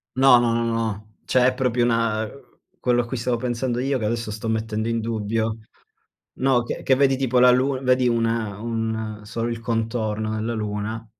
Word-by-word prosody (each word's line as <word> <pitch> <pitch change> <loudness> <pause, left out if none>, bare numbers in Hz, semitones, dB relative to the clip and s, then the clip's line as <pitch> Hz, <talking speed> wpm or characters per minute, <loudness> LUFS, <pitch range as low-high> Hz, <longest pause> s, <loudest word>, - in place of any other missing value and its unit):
No, 130 -2 +7
no, 120 -1 +2
no, 115 0 0
no, 115 - -1
no. 110 -2 -3
Cioè 125 -1 +3
è 130 - +2
proprio 125 -2 +1
una 115 -2 +1
uhm, 130 +4 -15 0.2
quello 120 -1 +2
a - - -8
cui 125 - -5
stavo 120 0 -1
pensando 120 0 -2
io, 135 +1 0
che 115 - -5
adesso 115 0 -2
sto 110 +1 -4
mettendo 110 0 -1
in 115 - 0
dubbio. 110 0 -2 0.8
No, 130 -2 +3
che 120 - -5
che 130 - +4
vedi 135 0 +3
tipo 130 -2 +1
la 125 0 +7
Luna 130 +1 +2
vedi 130 -1 +3
una 115 -3 0
un 110 -1 -3
solo 115 +2 -3
il 115 -1 -4
contorno 110 -1 -2
della 110 +2 -2
Luna, 110 +1 -4
115 Hz, 200 wpm, -23 LUFS, 110-125 Hz, 0.8 s, No